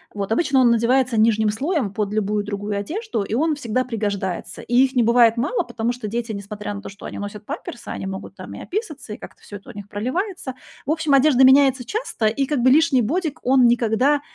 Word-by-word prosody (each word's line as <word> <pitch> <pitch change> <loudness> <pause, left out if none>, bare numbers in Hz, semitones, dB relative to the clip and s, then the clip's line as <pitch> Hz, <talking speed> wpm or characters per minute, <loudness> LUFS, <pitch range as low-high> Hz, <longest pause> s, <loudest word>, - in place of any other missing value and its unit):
Вот, 200 0 -4
обычно 270 +2 +2
он 245 - +5
надевается 235 +1 +2
нижним 220 -1 +3
слоем 260 - -1
под 210 -1 -2
любую 210 -1 0
другую 205 0 -4
одежду, 350 - -3
и 200 - -5
он 310 +4 +1
всегда 255 -2 -1
пригождается. 200 -6 -3
И 240 - -3
их 265 0 -6
не 245 - +4
бывает 235 0 +4
мало, 245 - 0
потому 230 0 -2
что 240 -3 -6
дети, 230 +2 -3
несмотря 205 +1 -6
на 200 - -7
то, - - -8
что 200 - -12
они - - -6
носят 205 +1 -7
памперсы, 240 - -7
они - - -5
могут 190 0 -7
там - - -9
и - - -8
описаться, 320 - -5
и - - -7
как-то - - -13
всё 205 - -10
это 200 - -16
у - - -15
них 205 -1 -8
проливается. 265 - -3 0.3
В 285 - 0
общем, 315 -2 0
одежда 270 -1 +5
меняется 265 -1 +5
часто, 390 - -2
и 250 +6 0
как 295 -2 0
бы 255 - +5
лишний 290 -3 +4
бодик, 315 - -2
он 255 0 +4
никогда 240 +5 +2
235 Hz, 220 wpm, -21 LUFS, 210-275 Hz, 0.3 s, он